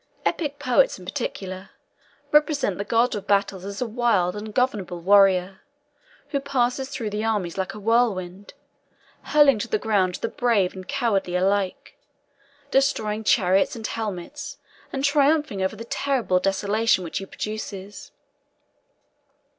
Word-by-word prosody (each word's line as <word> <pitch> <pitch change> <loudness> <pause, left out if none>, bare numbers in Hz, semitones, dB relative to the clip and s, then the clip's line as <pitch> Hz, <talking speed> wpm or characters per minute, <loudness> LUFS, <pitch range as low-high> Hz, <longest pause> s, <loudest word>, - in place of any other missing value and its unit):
Epic 290 -4 -1
poets, 270 -1 +2
in 185 - -12
particular, 185 0 -5 0.6
represent 295 - +2
the - - -1
god 230 +4 +2
of 205 - -5
battles 200 -2 +1
as 200 +4 -4
a - - -3
wild 220 -6 +1
ungovernable 210 -4 -2
warrior, 190 0 +4 0.7
who 285 -1 0
passes 265 -1 -1
through 225 -6 -4
the 210 +1 -2
armies 205 -6 -1
like 190 +1 -3
a - - -8
whirlwind, 205 -4 0 0.7
hurling 290 -6 +5
to 220 - -3
the 215 - +1
ground 200 -4 +1
the - - -3
brave 225 -7 +1
and 185 -1 -10
cowardly 220 -9 0
alike; 190 +1 0 0.8
destroying 220 -6 +1
chariots 195 0 +3
and 225 -2 -7
helmets, 225 +8 -5 0.3
and 270 -1 -3
triumphing 285 -6 +2
over 190 - -1
the 230 - -8
terrible 235 -8 0
desolation 200 +2 +1
which 165 - -4
he 195 - -6
produces. 205 -2 -7
210 Hz, 135 wpm, -24 LUFS, 190-250 Hz, 0.8 s, hurling